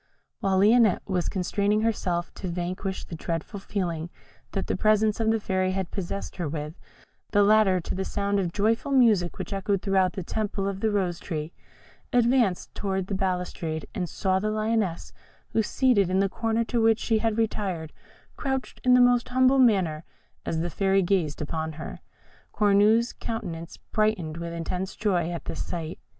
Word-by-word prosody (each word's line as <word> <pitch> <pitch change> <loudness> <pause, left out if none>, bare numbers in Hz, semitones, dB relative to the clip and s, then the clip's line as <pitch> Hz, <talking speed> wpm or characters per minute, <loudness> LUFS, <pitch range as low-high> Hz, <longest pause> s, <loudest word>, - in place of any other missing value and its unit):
While 195 -1 +1
Lionette 215 0 +5
was 185 -3 0
constraining 205 +3 0
herself 180 -6 -1
to 190 - -6
vanquish 180 +2 -3
the - - -11
dreadful 165 +5 -4
feeling 175 -5 -3 0.4
that 195 - -1
the - - -1
presence 215 +1 +2
of 220 -1 +2
the 225 0 +2
Fairy 185 -2 0
had 190 -2 -3
possessed 195 +1 -5
her 170 -5 -2
with, 150 0 -4 0.6
the 205 -1 +5
latter, 205 -3 +5
to - - -4
the 190 - -2
sound 200 +1 -1
of 180 -3 -1
joyful 220 +8 0
music 220 -10 +4
which 190 -1 -5
echoed 195 0 -1
through 190 -2 +3
the 190 - -4
temple 200 0 -2
of 195 -1 -3
the 220 - +1
Rose 185 -5 0
tree, 155 -1 -5 0.6
advanced 240 -6 +2
towards 190 -2 -2
the - - -2
balustrade 180 -4 -2
and 180 -3 -3
saw 190 -2 0
the 215 +2 -1
Lioness, 215 -4 -1 0.4
who, 225 - +2
seated 215 -4 +2
in 185 - +1
the 195 +1 +3
corner 225 +2 0
to 230 0 -1
which 225 -1 +4
she 225 -2 +1
had 225 -1 0
retired, 195 -8 -2 0.4
crouched 265 -2 -3
in 250 0 +6
the 250 - +6
most 245 0 +4
humble 260 +1 +4
manner 185 -11 +3 0.4
as 160 - 0
the 175 +1 -2
Fairy 195 +2 +2
gazed 170 -6 0
on 160 0 -2
her. 155 +1 -7 0.5
Cornue's 210 +3 +3
countenance 175 -8 -6
brightened 215 -8 -1
with 170 0 -5
intense 180 +3 -4
joy 180 -6 0
at 170 -1 -5
this - - -4
sight. 165 -2 -5
195 Hz, 175 wpm, -26 LUFS, 175-220 Hz, 0.6 s, in